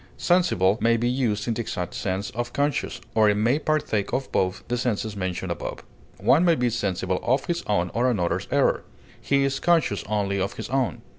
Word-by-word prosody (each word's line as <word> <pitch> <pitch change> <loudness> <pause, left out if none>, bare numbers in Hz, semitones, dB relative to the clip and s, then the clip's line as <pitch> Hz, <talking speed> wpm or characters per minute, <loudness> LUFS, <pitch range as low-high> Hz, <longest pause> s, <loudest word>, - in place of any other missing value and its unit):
Sensible 120 - +2
may 115 +1 +3
be 120 +1 0
used 120 -5 0
in 115 - +1
the 120 - -2
exact 90 -6 -4
sense 95 +1 -3
of 120 +1 -4
conscious, 145 +1 -1
or 110 -1 +4
it 105 - +2
may 115 +7 +2
partake 150 -10 0
of 135 - -2
both 95 0 0
the 120 - -1
senses 110 -3 -2
mentioned 95 -2 -3
above. - - -5 0.3
One 155 +6 +4
may 170 -2 +4
be 125 -3 0
sensible 95 -4 -1
of 130 +3 +1
his 170 0 -1
own 90 -4 +1
or 125 +2 +2
another's 90 -8 -1
error; - - +2 0.4
he 140 0 +2
is 135 0 0
conscious 165 - +2
only 100 -2 0
of 95 - -2
his - - -6
own. 130 -2 -1
115 Hz, 200 wpm, -25 LUFS, 100-135 Hz, 0.4 s, or